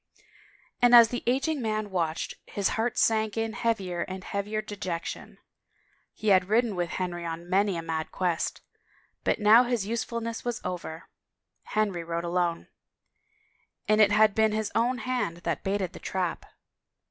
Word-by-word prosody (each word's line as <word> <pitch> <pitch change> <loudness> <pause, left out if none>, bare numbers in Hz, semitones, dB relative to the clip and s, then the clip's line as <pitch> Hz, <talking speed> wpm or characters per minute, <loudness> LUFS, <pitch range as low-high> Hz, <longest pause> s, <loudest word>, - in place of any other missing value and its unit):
And 245 0 +7
as 230 -2 +9
the 245 - -3
ageing 275 +4 +1
man 215 -2 -2
watched, 165 -3 -1
his 200 -1 0
heart 225 +1 -1
sank 220 -1 +2
in 225 0 -1
heavier 200 -7 -1
and 185 +1 -5
heavier 205 +3 -3
dejection. 200 -5 -5 0.8
He 215 - -1
had 185 -1 +4
ridden 225 -1 +2
with 175 -1 -1
Henry 175 -2 -3
on 165 +1 -5
many 195 0 +2
a 165 - -4
mad 160 -1 -3
quest... 180 -3 -1 0.6
but - - +1
now 220 +2 +7
his 240 -5 -1
usefulness 230 +1 -3
was 240 -1 -2
over... 170 -2 -5 0.6
Henry 205 -5 -1
rode 170 0 -3
alone. 175 -1 -1 1.2
And 215 0 +4
it 205 -1 +6
had 215 0 +5
been 220 0 +2
his 215 -1 -2
own 245 +3 +1
hand 245 -8 -2
that 170 -4 -2
baited 195 -2 -1
the - - -9
trap. 180 -3 -3
205 Hz, 155 wpm, -27 LUFS, 175-225 Hz, 1.2 s, as